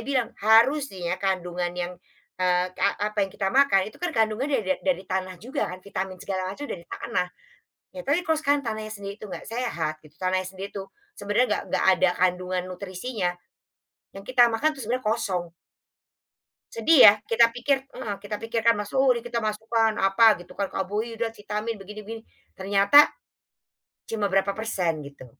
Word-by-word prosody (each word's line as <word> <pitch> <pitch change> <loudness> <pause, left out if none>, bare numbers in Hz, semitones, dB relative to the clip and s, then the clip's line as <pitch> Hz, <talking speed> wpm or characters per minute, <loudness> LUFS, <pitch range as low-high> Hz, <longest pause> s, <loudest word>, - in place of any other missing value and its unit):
bilang 255 -1 -1
harusnya 220 - +3
kandungan 180 -2 -1
yang, 180 0 -3 0.5
eee, 180 0 +2
a - - +4 0.2
apa 210 - -1
yang 195 - +1
kita 195 0 -3
makan 215 -7 +3
itu - - -19
kan 355 - -1
kandungannya 225 +3 +1
da 185 0 +1
dari 265 -9 -1
tanah 185 -1 -3
juga 255 - -3
kan 185 +1 -9
vitamin 190 -1 -4
segala 185 0 -3
macam 200 +10 -6
udah 280 - -5
di - - -21
tanah 230 -6 -2 0.7
ya, - - -4
tapi 290 +6 +2
kalo 320 -2 0
sekarang 290 -2 +1
tanahnya 215 -3 -5
sendiri 200 -1 -7
itu 215 - -11
nggak 200 - -8
sehat 225 -10 -2
gitu 150 -1 -18
tanahnya 185 0 0
sendiri 190 +2 -7
itu 195 -1 -7 0.3
sebenarnya 205 +5 +1
nggak 210 - 0
nggak - - +1
ada 185 -1 +3
kandungan 180 0 +1
nutrisinya, 185 +2 -3 0.8
yang 195 0 -10
kita 250 -1 +6
makan 305 +7 +1
itu 270 - -7
sebenernya 250 +3 -2
kosong. 185 -7 -1 1.2
Sedih 270 +7 +4
ya? 205 - +11 0.2
Kita 230 0 +6
pikir 260 +3 +1 0.2
heeh, 220 -6 -4
kita 210 +1 -4
pikir 225 0 -1
kan 230 - +7
masuk 250 +3 +2
kita 240 0 -3
masukkan, 225 +1 +1
apa 195 +4 +4 0.2
gitu 175 +1 -12
kan, 200 -1 -1
karbohidrat, 225 +4 -3
vitamin, 210 +2 -4
begini 210 +2 -9
begini 225 +1 -7 0.3
ternyata, 200 +7 +4 1.1
cuma 215 -2 0
berapa 195 +1 +2
persen 190 -7 -2
gitu. 140 -2 -13
205 Hz, 170 wpm, -25 LUFS, 185-235 Hz, 1.2 s, ya